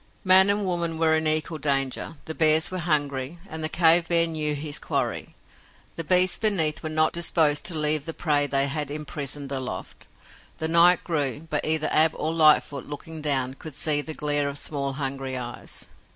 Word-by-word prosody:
Man 190 +1 +5
and 205 0 +1
woman 170 -3 -2
were 160 -1 +2
in 160 0 0
equal 155 +1 +1
danger. 135 +2 -2
The 160 - -6
bears 155 +1 +4
were 185 - -4
hungry 145 -2 -2
and 160 -3 -7
the 155 - -2
cave 170 0 +4
bear 170 -1 +3
knew 155 -2 -2
his 150 0 -4
quarry. - - -4 0.6
The 165 - -6
beasts 180 +3 +4
beneath 170 -9 +2
were 155 - -5
not 155 0 +1
disposed 165 -2 +1
to 175 -6 +2
leave 150 -1 0
the 165 - -6
prey 145 -3 0
they 140 -1 +2
had 145 0 -3
imprisoned 145 -1 -6
aloft. 125 -9 -7 0.5
The 160 - -2
night 170 +2 +5
grew, 145 -2 -3
but 150 - -1
either 155 0 +2
Ab 160 +1 +4
or 160 +1 -3
Lightfoot, 150 -3 +2
looking 155 +2 -8
down, 135 -3 -1
could 150 +1 -11
see 150 -2 +2
the 155 +1 -7
glare 145 -1 -1
of 140 - -6
small, 140 -2 -3
hungry 135 -1 -4
eyes. 120 -1 -4
155 Hz, 185 wpm, -24 LUFS, 145-165 Hz, 0.6 s, Man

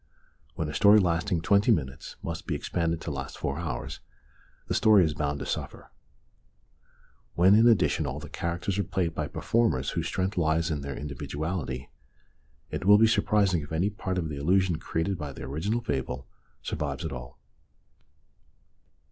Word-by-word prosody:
When 80 - -2
a 75 - -5
story 105 +4 +6
lasting 85 -2 +1
twenty 100 +7 +4
minutes 65 - -2
must 85 -1 -5
be - - -1
expanded 85 -1 -1
to 80 - -4
last 65 -1 -5
four 70 +3 -3
hours 70 -8 -4 0.7
the - - -2
story 105 -5 +5
is 80 - -1
bound 75 -1 -2
to - - -4
suffer. - - -5 1.4
When, 90 +3 +6
in 110 +3 +6
addition, 115 -5 +3
all - - -4
the - - -9
characters 90 +3 -3
are - - +2
played 90 -4 -1
by 75 -2 -2
performers 80 - 0
whose - - -2
strength 95 +1 -1
lies 80 +1 +1
in 75 -2 -2
their 70 0 -5
individuality, 70 -1 -4 0.8
it - - -4
will 105 +1 +8
be 110 - +6
surprising 100 -5 +2
if 75 - -10
any 90 +6 +1
part 95 -2 -3
of 85 -3 -1
the 75 -2 -5
illusion 90 +3 +2
created 85 +4 -2
by 75 -2 -5
the - - -9
original 85 - -2
fable 65 - -3 0.4
survives - - -3
at - - -3
all. 60 -1 -8
85 Hz, 165 wpm, -28 LUFS, 75-95 Hz, 1.4 s, will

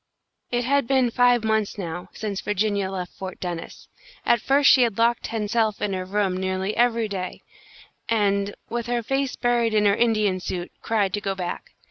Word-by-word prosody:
It 245 0 0
had 280 0 +1
been 260 -2 +2
five 245 -1 +4
months, 220 -2 0
now, 175 -2 -5
since 205 -3 -4
Virginia 205 -1 0
left 185 -2 -5
Fort 190 -1 -7
Dennis. 175 -2 -6 0.4
At 235 - +3
first 280 +3 +5
she 260 - +6
had 230 -5 +2
locked 235 +1 +2
hen 220 -2 -2
self 220 -1 +1
in 205 -2 -1
her 185 -1 -3
room 195 -1 0
nearly 190 +2 -2
every 235 -2 +2
day, 190 -3 -5 0.7
and, 200 -2 +1
with 235 0 -3
her 240 -1 -1
face 270 +2 -1
buried 235 -2 +1
in 210 -1 +3
her 200 0 +4
Indian 215 -5 +2
suit, 180 -1 -5
cried 205 -4 0
to 205 - -1
go 195 -1 -2
back. 180 -2 -6
215 Hz, 185 wpm, -24 LUFS, 195-235 Hz, 0.7 s, she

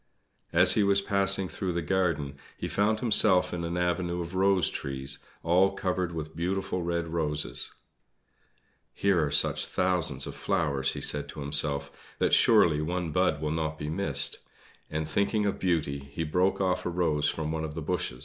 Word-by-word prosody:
As 90 +2 +6
he 110 - +2
was 100 -1 +3
passing 100 -1 +2
through 90 0 -4
the 85 - -2
garden 85 -7 -1 0.2
he - - -4
found 110 +2 0
himself 105 -5 +5
in 85 -1 -4
an 85 +1 -3
avenue 90 0 -1
of 85 +1 -6
rose 95 -2 +2
trees, 70 0 -4 0.2
all 90 +4 +3
covered 90 -2 -2
with 80 -1 -6
beautiful 90 +2 -2
red 85 -1 -2
roses. 75 -3 -3 1.2
"Here 95 -5 +2
are 75 - -1
such 70 - +3
thousands 90 -7 0
of - - -7
flowers," 80 -9 0
he - - -6
said 75 0 -1
to - - -8
himself, 70 -1 0 0.3
"that, - - 0
surely, 75 -3 +5
one 85 +1 -3
bud 90 -3 +1
will 75 - -1
not 80 -1 -2
be 75 0 -5
missed;" 100 +5 0 0.5
and, 75 0 -3
thinking 105 +5 0
of 100 - -2
Beauty, 80 -6 -1
he 70 +4 -6
broke 90 +5 0
off 95 -1 0
a - - -2
rose 85 -4 0
from 80 -1 -3
one 80 0 -3
of 75 -1 -6
the 80 - -4
bushes. 65 -3 -3
85 Hz, 180 wpm, -28 LUFS, 75-95 Hz, 1.2 s, As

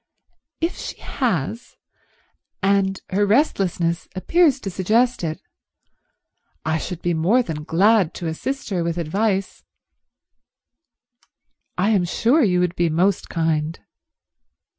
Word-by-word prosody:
"If 330 +2 -1
she - - -6
has, 230 - -3 0.9
and 195 -1 +2
her 200 +2 +2
restlessness 195 - +1
appears 300 - +3
to 195 - -4
suggest 220 +6 +1
it, 160 -1 -3 1.3
I 160 0 0
should 175 +1 -6
be 175 - +1
more 190 +11 +3
than 150 -6 -5
glad 195 +1 +3
to 175 - -6
assist 220 +11 -4
her 180 -3 0
with 170 0 -2
advice." 195 +4 -1 2.1
"I 195 +4 +2
am 195 -5 +2
sure 240 - +2
you 180 -8 +3
would 180 0 0
be 170 -1 +1
most 180 +5 +1
kind." 160 -1 -1
185 Hz, 120 wpm, -22 LUFS, 165-220 Hz, 2.1 s, appears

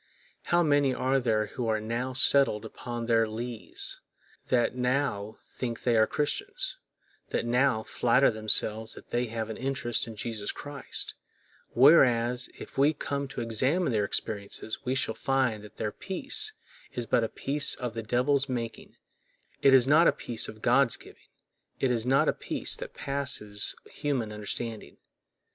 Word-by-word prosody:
How 175 0 +3
many 145 -4 +3
are 135 +1 +1
there 110 -4 +1
who 120 +2 -5
are 110 -1 +1
now 115 +4 -3
settled 130 -4 +3
upon 120 +1 -6
their 115 -1 +3
lees, 115 +1 -5 0.5
that 120 -2 +2
now 125 -5 -1
think 120 -3 -5
they 120 -2 +2
are 110 -1 +4
Christians, 415 - -1 0.5
that - - -2
now 125 -1 +2
flatter 125 +4 +3
themselves 110 0 +2
that - - -14
they 120 +1 0
have 110 0 -4
an 110 - -6
interest 130 -3 -1
in 115 - -8
Jesus 105 -1 -4
Christ; 145 -1 -5 0.6
whereas 125 -3 +5
if - - -8
we 145 +3 +5
come 140 -1 -3
to 135 -2 -6
examine 130 - +1
their 105 -3 +1
experiences 100 +2 -4
we 130 0 -1
shall 115 - 0
find 130 -5 0
that 105 0 -14
their 105 -1 -2
peace 285 - +1 0.4
is 120 - -3
but 120 0 +2
a 110 - -1
peace 140 +1 +1
of 125 -3 -5
the 115 - -4
devil's 130 +5 +1
making—it 120 +2 -4
is 130 -1 +6
not 155 +4 +6
a - - +6
peace 115 -2 -2
of 110 - -12
God's 125 0 +4
giving—it 130 - -7
is 120 0 -1
not 135 +1 +3
a - - +3
peace - - -1
that - - -8
passeth 135 -7 0 0.2
human 135 -7 -2
understanding. 105 -3 -6
120 Hz, 155 wpm, -28 LUFS, 110-135 Hz, 0.6 s, is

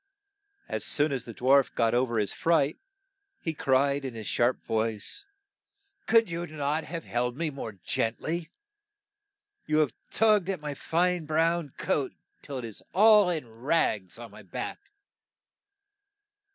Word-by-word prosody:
As - - -2
soon 150 +1 +2
as 135 -3 -3
the 115 - -8
dwarf 135 +2 +3
got 115 -1 +2
o 125 +1 +4
ver 115 -1 -2
his 105 -2 0
fright, 160 -3 +2 0.6
he 165 - -3
cried 140 0 +2
in 130 -3 -5
his 110 -1 -6
sharp 120 +4 +1
voice 115 - -1 0.2
' 410 0 -57
' 395 0 -46
Could 230 -1 +5
you 170 +1 -4
not 150 0 -2
have 165 0 -5
held 125 +1 -2
me 165 -1 -1
more 125 -6 -6
gent 110 +4 -2
ly? 165 0 -3 1.2
You 155 - +2
have 150 -6 +2 0.2
tugged 210 -4 +3
at 190 -3 -1
my 150 -1 -4
fine 175 +2 0
brown 165 -1 +1
coat 140 -3 -1 0.3
till 140 -2 -6
it 125 - -5
is 110 -3 -8
all 210 -1 +7
in 160 -8 -2
rags 115 - 0
on 120 -1 -10
my - - -12
back.' - - -6
145 Hz, 160 wpm, -28 LUFS, 120-170 Hz, 1.2 s, all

